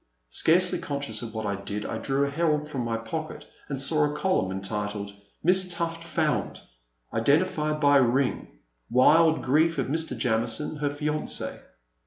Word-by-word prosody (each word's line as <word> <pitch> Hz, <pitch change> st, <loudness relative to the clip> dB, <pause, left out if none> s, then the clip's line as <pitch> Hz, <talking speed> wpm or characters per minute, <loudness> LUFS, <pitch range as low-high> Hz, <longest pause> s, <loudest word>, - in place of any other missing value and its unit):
Scarcely 180 Hz, -, +3 dB
conscious 140 Hz, -7 st, -2 dB
of 115 Hz, -2 st, -7 dB
what 110 Hz, -1 st, -3 dB
I 100 Hz, -, -1 dB
did 100 Hz, +1 st, -5 dB
I 110 Hz, -, -4 dB
drew 135 Hz, +4 st, 0 dB
a -, -, -2 dB
Herald 150 Hz, -1 st, 0 dB
from 140 Hz, -4 st, -4 dB
my 115 Hz, -1 st, -2 dB
pocket 155 Hz, +8 st, -6 dB, 0.2 s
and 140 Hz, -2 st, -3 dB
saw 150 Hz, +2 st, +2 dB
the 150 Hz, -, -4 dB
column 150 Hz, -, 0 dB
entitled: 100 Hz, +1 st, -4 dB, 0.3 s
Miss 185 Hz, +2 st, +4 dB
Tufil 165 Hz, -1 st, -2 dB
Found! 165 Hz, -2 st, -1 dB, 0.5 s
Identified 150 Hz, +4 st, +1 dB
by 145 Hz, -1 st, +5 dB
a -, -, +5 dB
Ring. 130 Hz, +2 st, +1 dB, 0.4 s
Wild 160 Hz, +6 st, +4 dB
Grief 160 Hz, +5 st, +2 dB
of -, -, 0 dB
Mr. 160 Hz, -4 st, -1 dB
Jamison, 115 Hz, +5 st, 0 dB
her 145 Hz, -1 st, -1 dB
Fianc6. 150 Hz, +1 st, -3 dB
145 Hz, 160 wpm, -26 LUFS, 115-160 Hz, 0.5 s, by